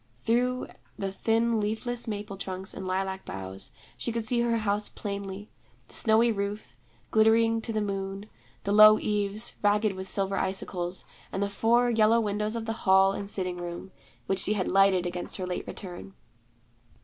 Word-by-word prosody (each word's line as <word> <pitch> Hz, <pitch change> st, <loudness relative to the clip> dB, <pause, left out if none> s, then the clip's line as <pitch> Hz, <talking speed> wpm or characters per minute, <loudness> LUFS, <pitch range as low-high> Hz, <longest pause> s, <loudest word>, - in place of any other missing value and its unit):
Through 245 Hz, -, 0 dB, 0.3 s
the 195 Hz, -1 st, -2 dB
thin 225 Hz, +3 st, +1 dB
leafless 225 Hz, +3 st, -3 dB
maple 205 Hz, -2 st, -4 dB
trunks 190 Hz, -1 st, -4 dB
and 190 Hz, -, -6 dB
lilac 190 Hz, +1 st, -2 dB
boughs 95 Hz, +1 st, -6 dB, 0.2 s
she 235 Hz, -, -2 dB
could 230 Hz, -1 st, -3 dB
see 235 Hz, +2 st, 0 dB
her 235 Hz, -1 st, +2 dB
house 210 Hz, -1 st, -1 dB
plainly: 200 Hz, 0 st, -6 dB, 0.4 s
the -, -, -11 dB
snowy 230 Hz, +1 st, +4 dB
roof, 200 Hz, -, -4 dB, 0.4 s
glittering 225 Hz, +1 st, +4 dB
to 225 Hz, -, -3 dB
the 215 Hz, -1 st, 0 dB
moon, 195 Hz, 0 st, -3 dB, 0.4 s
the 200 Hz, -, -1 dB
low 215 Hz, +1 st, +9 dB
eaves, 210 Hz, +1 st, -1 dB
ragged 210 Hz, 0 st, +3 dB
with 190 Hz, 0 st, -6 dB
silver 195 Hz, 0 st, -1 dB
icicles, 185 Hz, -1 st, -2 dB, 0.3 s
and 195 Hz, -, -1 dB
the 200 Hz, -, -2 dB
four 240 Hz, +4 st, +3 dB
yellow 225 Hz, 0 st, +4 dB
windows 210 Hz, 0 st, -1 dB
of 230 Hz, -1 st, -3 dB
the 225 Hz, -, -2 dB, 0.2 s
hall 190 Hz, 0 st, +6 dB
and 200 Hz, 0 st, -5 dB
sitting 185 Hz, -3 st, -3 dB
room, 175 Hz, +2 st, -6 dB, 0.3 s
which 190 Hz, 0 st, 0 dB
she 205 Hz, -, +1 dB
had 190 Hz, -4 st, -1 dB
lighted 195 Hz, -2 st, +4 dB
against 175 Hz, 0 st, -3 dB
her 185 Hz, -, -3 dB
late 180 Hz, -1 st, -4 dB
return. 190 Hz, 0 st, -8 dB
205 Hz, 170 wpm, -28 LUFS, 190-220 Hz, 0.4 s, low